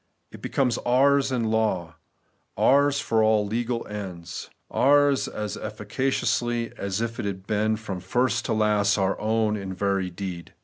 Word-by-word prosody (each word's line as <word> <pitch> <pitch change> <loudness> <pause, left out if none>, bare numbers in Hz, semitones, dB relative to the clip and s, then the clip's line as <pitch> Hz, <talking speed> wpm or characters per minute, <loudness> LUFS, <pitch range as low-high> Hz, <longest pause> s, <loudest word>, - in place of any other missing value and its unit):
It - - -12
becomes 125 -3 0
ours 135 +3 +3
in 115 -4 0
law; 95 -7 0 0.6
ours 140 +1 +4
for 115 -4 +1
all 110 -1 +3
legal 115 +3 -2
ends; 90 -5 -7 0.2
ours 145 0 +4
as 105 -1 -4
efi&caciously 120 +2 -1
as 100 +2 -3
if 115 +1 -3
it 120 - -2
had 95 -1 -4
been 110 +1 +1
from 105 -4 -6
first 120 +8 0
to 115 - 0
last 105 -1 +2
our 95 -1 +1
own 110 0 +1
in 95 -2 -5
very 95 -1 0
deed. 90 -1 -7
110 Hz, 150 wpm, -25 LUFS, 100-120 Hz, 0.6 s, ours